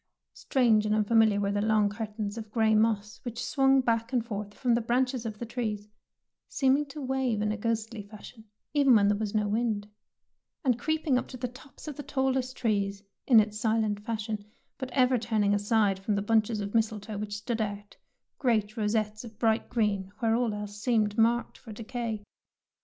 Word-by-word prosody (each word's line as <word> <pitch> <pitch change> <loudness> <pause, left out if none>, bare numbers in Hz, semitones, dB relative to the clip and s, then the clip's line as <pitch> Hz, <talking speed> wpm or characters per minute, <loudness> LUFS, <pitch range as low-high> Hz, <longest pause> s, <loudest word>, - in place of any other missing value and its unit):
Strange 225 -6 +2
and 210 - +2
unfamiliar 215 -1 +4
were 200 0 0
the 205 0 0
long 215 -1 +3
curtains 210 0 -4
of 220 -2 -7
grey 220 0 +2
moss 215 0 +1
which 240 -1 -4
swung 270 -1 +4
back 230 -1 0
and 245 -3 0
forth 210 -3 -5
from 245 +3 0
the 235 - +2
branches 245 +1 0
of 215 -1 -6
the 235 - -5
trees, 215 -3 -4 0.6
seeming 275 +2 +2
to 285 +2 -9
wave 265 -4 -1
in 210 0 0
a - - -1
ghostly 225 0 -2
fashion 215 +2 -13 0.3
even 280 -4 +5
when 200 -2 +5
there 205 - +2
was 215 -1 -3
no 210 -1 +2
wind, 215 -1 -1 0.8
and 245 -2 +2
creeping 310 -1 +1
up - - -6
to 255 - -9
the 250 0 -3
tops 265 +5 -14
of 295 - -6
the - - -4
tall 265 -2 0
est 260 0 -2
trees 200 -3 -1 0.2
in 235 -4 +8
its 210 0 0
silent 220 -2 +1
fashion, 215 -2 -3 0.4
but 260 -1 -4
ever 255 -1 +3
turning 215 -3 +1
aside 205 -1 +2
from 205 +2 -1
the 200 - 0
bunches 220 0 +2
of 200 0 -5
mis 225 -1 +3
tletoe 210 -1 -7
which 205 0 -4
stood 225 +2 -3
out, 205 -1 -5 0.4
great 220 -5 +1
rosettes 215 0 -1
of 225 -3 -11
bright 225 -1 +1
green 205 -5 0
where 225 0 +1
all 235 -1 +1
else 205 0 -7
seemed 215 -4 +1
marked 230 +2 +1
for 225 - -11
decay. 225 -1 -4
220 Hz, 195 wpm, -28 LUFS, 210-240 Hz, 0.8 s, in